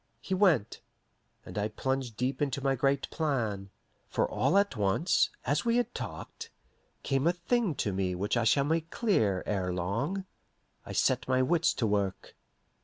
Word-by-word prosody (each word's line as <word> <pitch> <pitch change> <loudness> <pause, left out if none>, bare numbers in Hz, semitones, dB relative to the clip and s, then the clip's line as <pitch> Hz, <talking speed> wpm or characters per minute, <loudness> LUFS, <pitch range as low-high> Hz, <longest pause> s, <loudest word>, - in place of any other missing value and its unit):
He - - -4
went, 180 - +2 0.6
and - - -5
I 105 - 0
plunged 130 -1 -3
deep 130 +2 -1
into 140 -1 0
my 135 -1 +2
great 135 +1 +1
plan; 115 -11 -1 0.4
for - - +1
all 190 - +1
at 200 -6 +2
once, 105 - +2 0.2
as 145 +4 +1
we 235 0 +2
had 245 - 0
talked, 455 0 -7 0.5
came 135 +2 +1
a 175 - +4
thing 180 0 0
to 100 - -1
me 95 -1 -1
which 100 +6 -1
I 120 - +2
shall 140 +5 +4
make 160 +2 0
clear 110 - +1
ere 95 -3 -1
long. 115 - -2 0.6
I - - -6
set - - +1
my 130 0 +3
wits 165 +4 +3
to 120 - 0
work. 100 -3 -1
135 Hz, 170 wpm, -30 LUFS, 105-170 Hz, 0.6 s, a